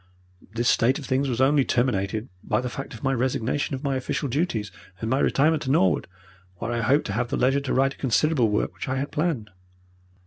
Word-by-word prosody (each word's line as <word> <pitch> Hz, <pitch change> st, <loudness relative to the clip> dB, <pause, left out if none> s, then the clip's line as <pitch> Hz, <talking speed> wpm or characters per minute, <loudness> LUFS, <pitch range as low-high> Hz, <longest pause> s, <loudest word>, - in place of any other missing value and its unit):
This 120 Hz, +1 st, 0 dB
state 125 Hz, +4 st, +3 dB
of 145 Hz, -, -7 dB
things 135 Hz, +1 st, 0 dB
was 120 Hz, -2 st, -2 dB
only 140 Hz, +1 st, +4 dB
terminated 110 Hz, -3 st, 0 dB, 0.2 s
by -, -, 0 dB
the 125 Hz, 0 st, -4 dB
fact 135 Hz, -2 st, -6 dB
of 110 Hz, -, -12 dB
my 135 Hz, -1 st, +1 dB
resignation 130 Hz, +3 st, -1 dB
of 130 Hz, -, -8 dB
my 140 Hz, -2 st, 0 dB
official 130 Hz, +2 st, -2 dB
duties 120 Hz, -, -1 dB, 0.3 s
and 110 Hz, +3 st, -3 dB
my 130 Hz, -, +2 dB
retirement 155 Hz, +2 st, +2 dB
to 130 Hz, -, -4 dB
Norwood, 95 Hz, -, +2 dB, 0.5 s
where 115 Hz, +6 st, -4 dB
I 120 Hz, 0 st, -1 dB
hoped 135 Hz, +6 st, +2 dB
to 100 Hz, -, -3 dB
have 120 Hz, +3 st, 0 dB
the -, -, -2 dB
leisure 135 Hz, +3 st, +3 dB
to 140 Hz, -, -4 dB
write 135 Hz, +1 st, +2 dB
a -, -, -20 dB
considerable 135 Hz, -1 st, +2 dB
work 105 Hz, -, 0 dB
which -, -, -6 dB
I 130 Hz, -, 0 dB
had 140 Hz, +2 st, -3 dB
planned. 150 Hz, -10 st, -1 dB
130 Hz, 220 wpm, -25 LUFS, 115-140 Hz, 0.5 s, only